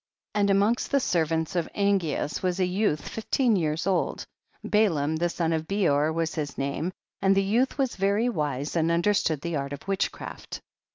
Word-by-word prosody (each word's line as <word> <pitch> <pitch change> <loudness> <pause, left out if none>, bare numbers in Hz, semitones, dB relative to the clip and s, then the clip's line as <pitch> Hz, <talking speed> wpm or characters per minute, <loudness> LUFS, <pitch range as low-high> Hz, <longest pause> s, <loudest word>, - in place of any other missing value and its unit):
8. 210 - 0
And 200 0 +3
amongst 205 +5 +2
the 280 - +3
servants 165 - 0
of 170 -2 0
Angeas 190 -7 0
was 185 0 -1
a - - +3
yoiith 180 -4 0
fifteen 230 +1 0
years 160 -3 0
old, 190 -2 0 0.4
Balaam 160 -8 +2
the 175 +2 +1
son 165 -1 -1
of 160 0 -2
Bcor 160 -7 +2
was 165 0 -1
his 150 -3 -4
name, 140 +6 -2 0.3
and 195 0 +4
the 195 - +4
youth 235 +9 +1
was 265 -3 0
very 200 +4 +2
wise 150 - -2
and 165 -1 +2
understood 170 -4 +1
ihc 170 -4 -1
art 140 +1 -4
of 145 +6 -9
witchcraft. 195 0 -3
175 Hz, 180 wpm, -26 LUFS, 155-200 Hz, 0.4 s, and